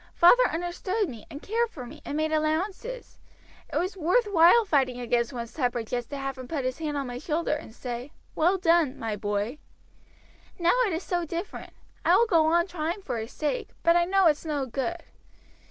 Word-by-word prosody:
"Father 360 +9 +6
understood 355 +5 -2
me, 230 -5 -10
and 295 -2 -9
cared 460 +3 0
for 260 - -8
me, 275 +6 -11
and 290 - -4
made 310 0 0
allowances. 370 +10 -2 0.5
It - - -1
was 370 +3 -1
worth 375 +8 +2
while 405 +3 +6
fighting 265 -8 +1
against 240 0 0
one's 235 -2 -6
temper 245 -5 -1
just 240 +1 -4
to 285 - -5
have 270 -1 -4
him 255 - -7
put 285 -4 -3
his 255 +4 -2
hand 300 -2 -2
on 280 - -2
my 245 0 -5
shoulder 315 +3 -1
and 295 - -5
say, 245 +3 -6 0.2
'Well 355 +5 +2
done, 335 -6 +3
my 225 -2 -3
boy.' 205 +6 -2 1.0
Now 345 0 +3
it 385 - -2
is 330 +3 -3
so 350 -1 -1
different. 335 +4 -6 0.3
I - - +5
will 470 - +5
go 330 -8 +3
on 340 +1 +3
trying 350 +1 -4
for 245 -7 -3
his 220 +2 -6
sake; 315 +11 -2
but 335 0 +5
I 345 0 +4
know 385 +1 +3
it's 305 -3 +3
no 295 -4 -2
good. 275 +7 -3
315 Hz, 200 wpm, -27 LUFS, 255-350 Hz, 1.0 s, Father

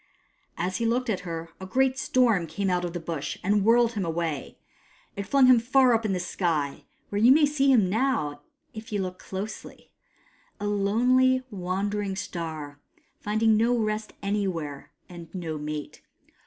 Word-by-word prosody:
As 180 +1 -2
he 230 - -1
looked 240 0 0
at 195 - -1
her, 165 -2 -6
a 190 - -7
great 260 +6 +2
storm 230 -12 +2
came 190 +4 -2
out 180 0 0
of 175 -1 -3
the 175 - -3
Bush 160 -3 -4
and 205 +1 +2
whirled 230 +2 +4
him 205 -3 -2
away. 165 -4 -3 0.6
It 200 -1 -5
flung 275 -2 +5
him 255 -2 +7
far 255 +1 +4
up 225 -1 +1
in 210 - 0
the 185 - 0
sky, 165 -5 -2 0.2
where 205 0 -1
you 240 +3 +7
may 295 +2 +6
see 280 -2 +2
him 220 -8 +4
now, 185 - 0 0.3
if 220 0 -9
you 205 - -1
look 185 -1 -4
closely: 200 +3 -7 0.7
a - - -4
lonely, 250 +6 +3
wandering 195 +1 -2
star, 160 -6 -6 0.4
finding 220 +1 +2
no 235 +3 +2
rest 215 -1 -2
anywhere, 185 -8 -3 0.2
and 170 -2 -11
no 160 -4 -4
mate. 150 0 -6
200 Hz, 170 wpm, -26 LUFS, 170-230 Hz, 0.7 s, him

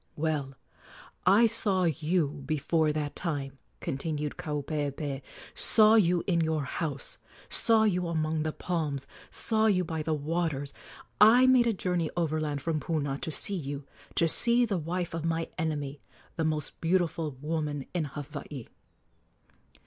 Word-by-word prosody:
"Well, 145 -3 -1 0.7
I 205 +5 +7
saw 210 -4 +2
you 160 -2 0
before 155 +1 +1
that 150 -1 -3
time," 140 -6 -3 0.2
continued 150 +1 -3
Kaupeepee 145 -3 -3 0.3
"saw 215 -1 +5
you 180 -6 +4
in 170 -3 +2
your 160 -2 0
house; 140 0 -3 0.3
saw 225 -1 +4
you 180 -4 +1
among 160 -1 0
the 155 0 -1
palms; 150 -6 -2 0.2
saw 220 -1 +1
you 185 -4 +3
by 160 -2 -3
the 155 0 0
waters. 150 -2 -2 0.6
I 255 - +6
made 255 -2 +5
a - - +4
journey 180 -5 -1
overland 155 -4 -1
from 160 -1 0
Puna 145 -2 -2
to 170 - -4
see 200 +6 +1
you 145 -4 -5 0.3
to 165 - +4
see 235 +8 +3
the 200 -5 -1
wife 170 +2 -3
of 165 -1 -3
my 165 0 -1
enemy, 145 -3 -2 0.3
the 160 - 0
most 155 -2 -3
beautiful 165 -4 0
woman 150 -2 -2
in 175 -4 0
Hawaii." 145 -2 -7
160 Hz, 140 wpm, -29 LUFS, 145-175 Hz, 0.7 s, I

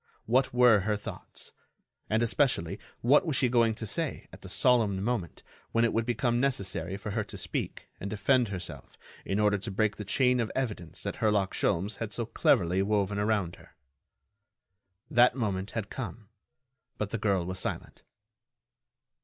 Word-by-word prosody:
What 130 +4 +2
were 125 -3 +6
her 105 +2 0
thoughts. 100 - -7 0.6
And, 110 +2 +2
especially, 115 - +1 0.2
what 140 +9 +5
was 160 -6 -1
she 130 -2 +3
going 115 -2 +3
to 110 - -5
say 100 - -3
at - - -12
the - - -10
solemn 115 -6 +3
moment 110 -6 -2 0.3
when 115 0 +4
it 115 - 0
would 115 +1 0
become 120 0 +1
necessary 95 -9 -1
for 105 +1 -6
her 110 +1 -1
to - - -8
speak - - -4
and 100 - -4
defend 120 +4 +2
herself 90 -4 -7 0.3
in 95 - -1
order 105 -1 +3
to 110 - -5
break 105 +2 0
the 105 - -5
chain 125 +4 +2
of 115 -2 -1
evidence 105 - -3
that - - -4
Herlock 105 -3 +1
Sholmes 100 +3 0
had - - -4
so - - -2
cleverly 90 +3 +2
woven 100 0 0
around 105 -5 0
her? - - -19 1.4
That 120 +1 +5
moment 100 -5 -2
had 105 -2 -3
come, 110 -3 -6 0.7
but 105 -1 -3
the 115 - -2
girl 100 -4 +1
was 95 +1 -3
silent. - - -4
105 Hz, 170 wpm, -29 LUFS, 100-120 Hz, 1.4 s, were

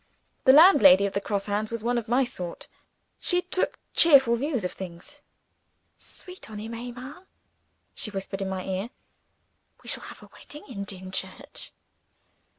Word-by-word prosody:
The 260 - +9
landlady 215 - +8
of 200 - -3
the 200 - -1
Cross 200 -1 -2
Hands 210 +1 -2
was 230 -2 -5
one 240 +1 +1
of 225 - -9
my 245 +4 +3
sort: 180 -8 -6 0.5
she 360 -1 +1
took 370 +1 -1 0.2
cheerful 270 -7 +6
views 255 -4 -2
of 180 - -2
things. 190 +11 -10 0.8
"Sweet 365 -7 -11
on 215 - -8
him 220 +2 -6
eh, 240 +2 -6
ma'am?" 260 +10 -10 0.7
she - - -3
whispered 195 -1 -5
in 195 - -2
my 190 -1 -4
ear; 190 +4 -3 0.9
"we - - -8
shall - - 0
have - - -11
a - - -15
wedding 295 - -12
in 200 -7 -6
Dimchurch." 190 -1 -6
225 Hz, 160 wpm, -26 LUFS, 195-265 Hz, 0.9 s, The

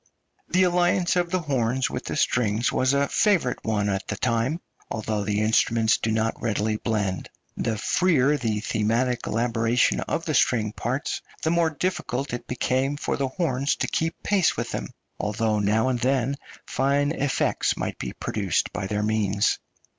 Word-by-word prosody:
The 185 +1 +4
alliance 180 0 +2
of 175 -1 +1
the 185 0 0
horns 130 -4 0
with 125 - -5
the - - -3
strings 120 -5 +1
was 130 0 +2
a 140 0 +2
favourite 190 - +1
one 105 -2 0
at 95 -1 -2
the 105 - -2
time, 120 - 0 0.3
although 110 -1 -2
the 105 +1 0
instruments 110 +1 +3
do 115 - -1
not 110 +1 0
readily 110 -1 0
blend. 105 -5 -2 0.3
The 110 -2 -1
freer 150 - +3
the 110 -6 -1
thematic 115 +3 0
elaboration 115 +1 +1
of - - -2
the - - -1
string 110 -3 +2
parts 130 +8 -2 0.2
the 160 - +2
more 170 -1 +3
difficult 145 -6 -2
it 120 - -5
became 130 +3 0
for - - -1
the 140 - -1
horns 140 -1 0
to - - -2
keep 165 +1 -2
pace 200 -4 +2
with - - -3
them, - - -3 0.3
although 110 0 0
now 110 +5 +2
and 125 -2 0
then 130 +1 +1 0.3
fine 140 +2 +1
effects 145 -4 0
might - - -4
be - - -4
produced 100 -6 -1
by 95 - -3
their 105 +1 -1
means. 105 -1 +1
120 Hz, 170 wpm, -25 LUFS, 110-145 Hz, 0.3 s, The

